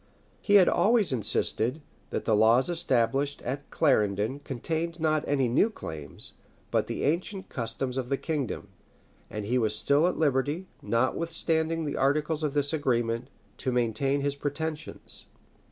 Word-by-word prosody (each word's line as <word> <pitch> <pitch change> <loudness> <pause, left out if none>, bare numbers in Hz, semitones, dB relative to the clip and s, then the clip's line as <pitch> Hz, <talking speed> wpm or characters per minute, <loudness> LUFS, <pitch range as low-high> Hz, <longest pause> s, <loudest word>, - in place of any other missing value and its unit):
He 205 - +3
had 190 -3 +7
always 215 - +3
insisted, 115 +3 +2 0.3
that - - -3
the 110 - +3
laws 115 +8 +4
established 140 -3 +1
at 140 +3 -4
Clarendon 110 -3 +1
contained 160 +5 -3
not 155 -1 +1
any 135 -3 +2
new 130 - +3
claims, 80 - -7 0.4
but - - +1
the - - -3
ancient 185 +6 -1
customs 125 +2 -3
of 125 -2 -3
the 140 - +1
kingdom; 145 -7 -3 0.6
and 105 -1 -5
he 125 +4 +1
was 110 -2 +2
still 145 +8 +3
at 180 - -1
liberty, 145 +4 +1 0.2
notwithstanding 160 +7 0
the 145 - -3
articles 150 +3 +1
of 150 -2 -2
this 145 +1 +1
agreement, 120 -5 0 0.3
to 130 - -1
maintain 125 +4 +1
his 140 0 -1
pretensions. 150 +2 -4
140 Hz, 145 wpm, -28 LUFS, 120-160 Hz, 0.6 s, had